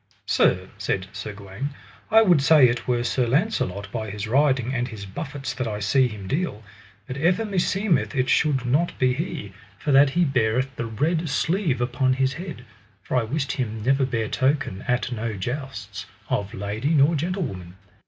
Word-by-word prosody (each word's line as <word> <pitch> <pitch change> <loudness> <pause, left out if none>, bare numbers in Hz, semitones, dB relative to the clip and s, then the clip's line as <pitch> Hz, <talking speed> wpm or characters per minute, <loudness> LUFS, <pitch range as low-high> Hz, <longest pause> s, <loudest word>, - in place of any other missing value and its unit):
Sir, - - +2
said 95 -1 -1
Sir 105 +2 -5
Gawaine, 105 +8 -6 0.3
I 225 +1 +7
would 175 -8 +4
say 145 -2 +7
it 120 0 -2
were 120 -1 +1
Sir 125 0 0
Launcelot 115 - 0
by 110 -1 -4
his 105 +1 -5
riding 130 0 +2
and 120 -1 -1
his 110 -5 -8
buffets 135 +6 -5
that 125 -1 -3
I 105 -1 -3
see 115 +6 +3
him 105 -4 -8
deal, 140 - -2 0.4
but 130 - -6
ever 180 +9 +2
meseemeth 195 -4 0
it 130 -1 +1
should 135 -5 +2
not 145 +8 +1
be 130 -1 +3
he, 145 - -4 0.2
for 145 - -2
that 140 +1 +6
he 175 +6 +2
beareth 130 0 0
the 115 - -3
red 160 +9 0
sleeve 160 -2 0
upon 130 +1 +1
his 130 0 +1
head; 165 -7 -7 0.4
for 105 - -3
I 125 - +4
wist 135 +6 -2
him 110 -4 -3
never 135 +3 +3
bear 115 -4 -1
token 130 -7 0
at 125 +1 0
no 115 -1 -3
jousts, 110 -2 -5 0.2
of 100 -1 -2
lady 110 +10 -1
nor 145 +3 +5
gentlewoman. 145 - -3
130 Hz, 180 wpm, -24 LUFS, 110-145 Hz, 0.4 s, I